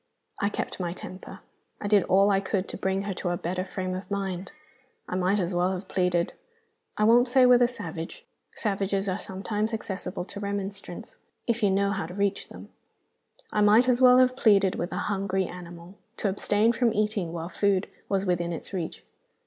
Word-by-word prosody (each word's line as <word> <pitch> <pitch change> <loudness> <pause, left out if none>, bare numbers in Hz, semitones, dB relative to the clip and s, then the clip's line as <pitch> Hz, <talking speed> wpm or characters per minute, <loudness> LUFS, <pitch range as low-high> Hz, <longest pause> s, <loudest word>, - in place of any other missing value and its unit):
I 200 - +1
kept - - -4
my 175 -2 -2
temper; 185 +1 -9 0.4
I 205 - -4
did 205 -1 +5
all 195 +2 +4
I 195 - +3
could 195 -1 -2
to - - -5
bring 190 +1 -1
her 200 -1 -3
to 180 - -3
a 175 - -1
better 180 +2 -2
frame 185 -1 -4
of 185 +3 -6
mind. 195 -2 -3 0.6
I - - -3
might 185 +3 +2
as 180 0 -1
well 180 +2 +1
have 185 +1 -6
pleaded 180 -2 +1 0.6
I 210 - +2
won't 240 +3 +6
say 255 +1 +5
with 250 0 +6
a 245 - +6
savage; 165 -9 -7 0.3
savages 195 -2 -1
are 185 +1 -1
sometimes 210 +3 -2
accessible 190 -4 -5
to 200 - -8
remonstrance, 200 - -5 0.3
if 235 0 0
you 205 - +4
know 200 +1 +2
how 190 -5 -2
to 180 - -9
reach 200 0 -1
them - - -11 0.8
I 210 - +1
might 215 +4 +6
as 250 0 +3
well 250 0 +8
have 255 0 +4
pleaded 200 -6 +4
with 175 - -3
a - - -3
hungry 195 -2 -1
animal 175 +1 -10 0.2
to 205 - 0
abstain 205 +3 +2
from 235 -2 +1
eating 210 -5 0
while 170 0 -5
food 195 -1 +1 0.2
was 195 0 +1
within 175 -2 0
its 165 - -6
reach. 175 -4 -4
195 Hz, 195 wpm, -27 LUFS, 185-210 Hz, 0.8 s, well